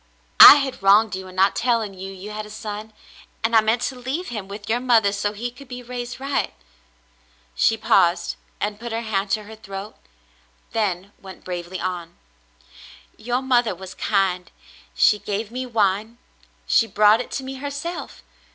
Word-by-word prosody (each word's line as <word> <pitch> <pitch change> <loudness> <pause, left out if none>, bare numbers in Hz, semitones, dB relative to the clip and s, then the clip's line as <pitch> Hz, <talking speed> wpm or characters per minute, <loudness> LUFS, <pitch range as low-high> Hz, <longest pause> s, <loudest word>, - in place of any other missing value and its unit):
"I - - +13
had 275 -5 -2
wronged 205 +2 +5
you 190 0 -7
in 185 - -12
not 190 +1 +3
telling 230 -4 0
you 190 +1 -8
you 195 +2 -9
had 215 0 -6
a - - -13
son, 215 0 -7 0.5
and 225 +1 +1
I 220 - +7
meant 225 +3 0
to 265 - -2
leave 260 +8 -4
him 210 -5 -6
with 205 +2 -9
your 230 +2 +1
mother 230 -5 +3
so 205 0 -1
he 235 +4 -5
could 275 +3 -14
be 250 0 -8
raised 245 0 -6
right." 275 - -2 1.0
She 225 - +2
paused, 170 -4 +2 0.2
and 205 0 -3
put 235 0 -6
her 225 +1 -2
hand 205 -3 -2
to 215 - 0
her 220 +1 -11
throat, 200 -1 -8 0.8
then 200 -3 -2
went 190 -1 -12
bravely 180 0 -5
on. 175 -2 -5 1.0
"Your 245 +4 -2
mother 245 -6 +2
was 190 +1 -10
kind 185 -4 0 0.3
— - - -23
she 210 - +4
gave 205 +2 -4
me 255 +1 -4
wine 220 0 0 0.3
— - - -33
she 230 - +3
brought 215 +2 +4
it - - -8
to 270 - -3
me 265 0 -7
herself. 285 +5 -6
215 Hz, 180 wpm, -22 LUFS, 195-240 Hz, 1.0 s, I